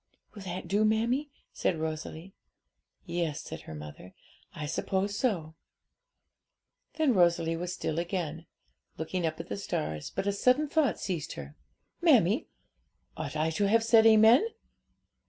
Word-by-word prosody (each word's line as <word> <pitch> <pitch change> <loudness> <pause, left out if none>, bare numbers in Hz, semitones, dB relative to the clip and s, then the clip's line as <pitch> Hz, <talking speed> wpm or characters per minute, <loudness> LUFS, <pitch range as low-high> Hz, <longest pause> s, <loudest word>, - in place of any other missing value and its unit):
'Will 205 - -10
that 185 -1 -5
do, 205 +4 +2
mammie?' 235 +7 +1 0.2
said 170 - 0
Rosalie. 160 +3 -5 0.7
'Yes,' 170 -4 -2
said - - -8
her 80 - -9
mother, 75 +4 -10 0.4
'I 150 - -4
suppose 190 +7 -1
so.' 180 -10 -1 1.4
Then 310 -5 +3
Rosalie 170 -3 +3
was 175 +2 -4
still 165 -3 -2
again, 170 -2 -3 0.5
looking 165 +2 -2
at 155 0 -3
the 165 +1 -5
stars; 75 - -3
but - - -3
a 200 - +2
sudden 250 +8 +3
thought 295 -4 +1
seized 175 -6 -3
her. 70 +1 -9 0.5
'Mammie, - - +4 0.7
ought 155 -1 -5
I 155 +1 +1
to 200 +6 0
have 225 +1 +4
said 225 0 +6
amen?' 220 - +7
180 Hz, 135 wpm, -29 LUFS, 160-220 Hz, 1.4 s, amen